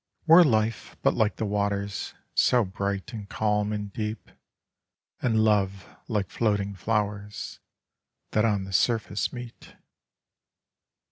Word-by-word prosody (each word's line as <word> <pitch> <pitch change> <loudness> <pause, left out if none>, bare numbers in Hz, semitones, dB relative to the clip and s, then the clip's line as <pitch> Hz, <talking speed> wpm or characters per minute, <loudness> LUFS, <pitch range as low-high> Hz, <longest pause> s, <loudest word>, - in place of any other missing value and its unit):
Were 165 +2 +9
life 110 - 0
but - - +4
like 105 -1 +1
the 110 - -2
waters, 100 0 -2 0.2
so 120 -3 +4
bright 100 +2 -3
and 105 -3 -7
calm 105 -1 0
and 105 -2 -4
deep, 105 -1 -4 0.9
and 110 -3 +2
love 100 -3 +1
like 105 -4 -1
floating 105 -3 0
flowers 105 0 -3 0.7
that 105 - +2
on 105 -4 +1
the 95 0 -8
surface 110 -2 +1
meat. 120 -2 -10
105 Hz, 120 wpm, -27 LUFS, 100-110 Hz, 0.9 s, Were